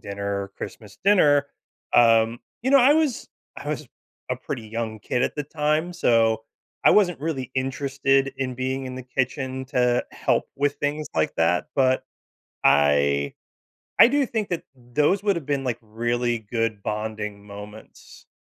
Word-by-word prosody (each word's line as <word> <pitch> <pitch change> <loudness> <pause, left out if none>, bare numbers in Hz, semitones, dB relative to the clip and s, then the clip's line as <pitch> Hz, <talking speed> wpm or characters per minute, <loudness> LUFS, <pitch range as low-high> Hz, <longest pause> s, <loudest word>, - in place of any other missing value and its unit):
dinner 100 0 -3
or - - -11
Christmas 105 -4 -9
dinner, 150 -8 +4 0.5
um 115 0 +5 0.2
You 260 - 0
know, 280 - +8
I 265 +3 +6
was 300 -6 +1 0.3
I - - -7
was - - -4 0.4
a - - 0
pretty 115 -5 -6
young 115 -1 -4
kid 125 +4 -1
at - - 0
the 150 - -2
time, 155 +4 -1
so 115 -8 +2 0.4
I - - +8
wasn't 180 -7 +4
really 145 -5 -3
interested 135 +1 0
in 130 -2 -3
being 130 +1 -2
in 130 -1 -6
the 130 - -6
kitchen 130 +1 -2
to 125 -2 +1
help - - 0
with 145 +1 +1
things 145 +1 -2
like 80 - +1
that, 85 +2 +1
but 130 -2 +2 0.6
I 70 -1 +3 0.7
I - - +9
do 280 +1 +2
think 220 -3 -3
that 175 - -2
those 145 +10 0
would 200 -3 +2
have 160 -5 -5
been, 140 -2 -1
like, 120 -3 -2
really 120 +2 -1
good 110 -1 -2
bonding 105 -1 -4
moments. 105 +1 -12
130 Hz, 160 wpm, -24 LUFS, 110-145 Hz, 0.7 s, I